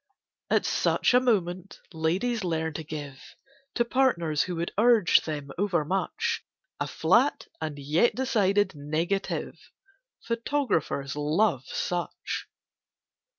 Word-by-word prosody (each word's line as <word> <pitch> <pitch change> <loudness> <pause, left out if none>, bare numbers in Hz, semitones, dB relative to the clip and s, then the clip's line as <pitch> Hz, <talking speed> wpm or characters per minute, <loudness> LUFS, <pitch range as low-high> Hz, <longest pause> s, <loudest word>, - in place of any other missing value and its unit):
At - - +2
such - - +2
a 250 - +7
moment 190 -7 -1
ladies 190 +9 0
learn 160 -2 -1
to 160 - -5
give, 145 -3 -8 0.4
To 235 - +2
partners 170 - +2
who 180 - -2
would 170 +1 -3
urge 220 -4 +5
them 145 -3 -5
over 180 -6 +1
much, 190 +5 -1 0.4
A - - -1
flat - - +2 0.2
and 150 -2 -4
yet 150 +11 +2
decided 205 -6 +2
negative— 160 +6 -3 0.5
Photographers 230 - -1
love 150 - +1
such. 175 -1 -3
175 Hz, 110 wpm, -27 LUFS, 155-220 Hz, 0.5 s, a